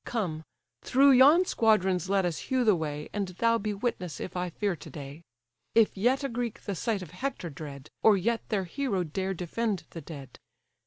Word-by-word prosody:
Come, 175 -9 -3 0.4
through 275 +2 +5
yon 285 +8 +7
squadrons 190 - +2
let 195 -1 +2
us 170 -3 -2
hew 260 -1 +2
the 215 -3 +5
way, 150 -2 -4
And 205 -2 -1
thou 230 +6 +1
be 215 0 -2
witness, 185 - -3
if - - -6
I 180 0 -1
fear 200 +2 -1
to 155 - -11
day; 145 +1 -9 0.5
If 225 -2 +4
yet 250 +8 +2
a - - 0
Greek 235 -2 -3
the 200 - -4
sight 200 +1 -1
of 160 - -11
Hector 180 - -4
dread, 140 -1 -9
Or 215 -2 +6
yet 230 +5 0
their 205 -3 0
hero 200 0 -1
dare 190 +4 -3
defend 195 +3 -2
the 165 - -7
dead." 140 -4 -10
195 Hz, 195 wpm, -28 LUFS, 170-230 Hz, 0.5 s, yon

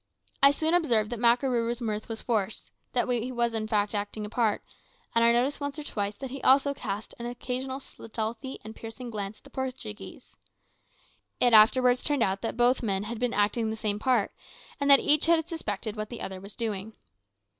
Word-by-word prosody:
I 275 - +9
soon 315 +3 0
observed 240 -11 +2
that 240 - -3
Makarooroo's 235 0 +2
mirth 215 -2 -3
was 225 -1 -5
forced, 220 -3 -2 0.2
that 245 - +1
he 245 0 -1
was 235 -1 0
in 220 -1 -2
fact 210 -1 +1
acting 210 +1 -3
a 210 - -8
part, 225 -3 +1 0.5
and 230 0 +4
I 235 - +6
noticed 250 +4 +1
once 285 0 -4
or 300 - -5
twice 205 -6 -3
that 270 -2 -6
he 275 - -6
also 275 +2 +4
cast 205 -5 -5
an 235 - -4
occasional 255 +2 -4
stealthy 230 +1 -6
and 220 +1 -9
piercing 230 +2 -8
glance 205 -1 -4
at - - -25
the - - -16
Portuguese. 255 -5 -7 1.0
It 245 -1 +4
afterwards 245 +3 +6
turned 290 -5 +2
out 195 0 0
that 225 - -4
both 245 +1 +3
men 200 -4 -1
had 220 +1 -5
been 245 -1 0
acting 215 +2 +1
the 220 - -2
same 210 -2 -2
part, 240 -3 +2 0.5
and 285 0 0
that 275 -1 +9
each 300 +2 +4
had 330 -1 +3
suspected 220 - -4
what 215 -1 -4
the 240 - -7
other 190 -1 -6
was 200 +1 -11
doing. 220 -2 -3
235 Hz, 200 wpm, -28 LUFS, 215-260 Hz, 1.0 s, I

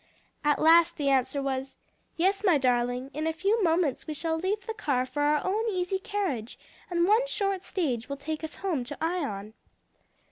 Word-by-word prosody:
At 295 -1 +3
last 335 +1 +5
the 285 -3 +1
answer 270 +1 +1
was, 265 0 -3 0.4
"Yes, 390 +4 +1
my 360 -7 +5
darling; 250 0 0
in 310 +2 -2
a - - +2
few 400 +8 +1
moments 330 -5 +1
we 310 - -4
shall 320 +2 -1
leave 390 +5 -2
the 445 - -3
car 280 - 0
for 290 +3 -4
our 295 0 +2
own 435 +4 0
easy 370 -1 -1
carriage, 380 - -3 0.3
and 345 -1 +2
one 450 +5 +4
short 395 -5 -1
stage 285 - -2
will 280 - -3
take 310 +3 -5
us 315 - -5
home 320 -10 0
to 290 +3 -7
Ion." 250 - -2
320 Hz, 185 wpm, -28 LUFS, 275-380 Hz, 0.4 s, last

